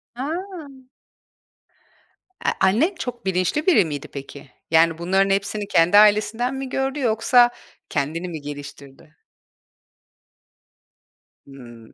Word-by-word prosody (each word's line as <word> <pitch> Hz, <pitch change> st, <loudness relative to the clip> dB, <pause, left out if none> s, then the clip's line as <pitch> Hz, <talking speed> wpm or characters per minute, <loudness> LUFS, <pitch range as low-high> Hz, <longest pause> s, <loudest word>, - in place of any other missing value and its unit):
A! 260 Hz, +2 st, -4 dB, 2.2 s
Eee, -, -, +3 dB
annen 275 Hz, -, +2 dB
çok 245 Hz, -4 st, -6 dB
bilinçli 190 Hz, -, -1 dB
biri 315 Hz, -, +5 dB
miydi, 145 Hz, -3 st, -6 dB
peki? 140 Hz, 0 st, -10 dB, 0.2 s
Yani, 165 Hz, 0 st, +4 dB
bunların 190 Hz, +3 st, +1 dB
hepsini 200 Hz, +1 st, -1 dB
kendi 175 Hz, +2 st, +4 dB
ailesinden 215 Hz, +5 st, +3 dB
mi 265 Hz, -1 st, -5 dB
gördü, 270 Hz, +2 st, -2 dB
yoksa 240 Hz, +1 st, +3 dB, 0.4 s
kendini 160 Hz, +5 st, -3 dB
mi 160 Hz, -3 st, -7 dB
geliştirdi? 145 Hz, 0 st, -11 dB, 2.3 s
Hımm. 120 Hz, -4 st, -14 dB
190 Hz, 100 wpm, -22 LUFS, 145-240 Hz, 2.3 s, biri